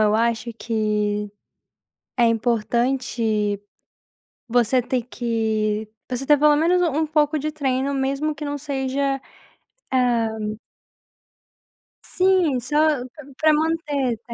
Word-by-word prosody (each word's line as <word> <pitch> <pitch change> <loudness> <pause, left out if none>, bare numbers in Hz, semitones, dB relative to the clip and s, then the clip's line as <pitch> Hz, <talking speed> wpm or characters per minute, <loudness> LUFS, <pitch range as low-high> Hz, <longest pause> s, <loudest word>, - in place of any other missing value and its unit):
eu 210 0 +3
acho 230 +1 0
que 210 -2 -1 0.9
é 240 - +4
importante 230 -2 0 0.9
você 245 +1 +3
ter 250 0 -1
que 220 -3 -1 0.2
você 255 +1 -3
ter 295 +1 +5
pelo 300 +1 +5
menos 350 +4 +3
um 320 -5 +1
um - - -2
pouco 300 0 +2
de 305 +2 -2
treino, 275 -2 -1
mesmo 275 +3 -1
que 290 - -7
não 290 0 -3
seja, 275 -1 -2 0.7
hã 245 -3 +2 1.8
Sim, 365 -8 +2
só 295 +1 +1
p 275 +2 -13
para 310 0 +5
manter, 300 -5 0
está 230 +1 -9
255 Hz, 115 wpm, -22 LUFS, 230-295 Hz, 1.8 s, ter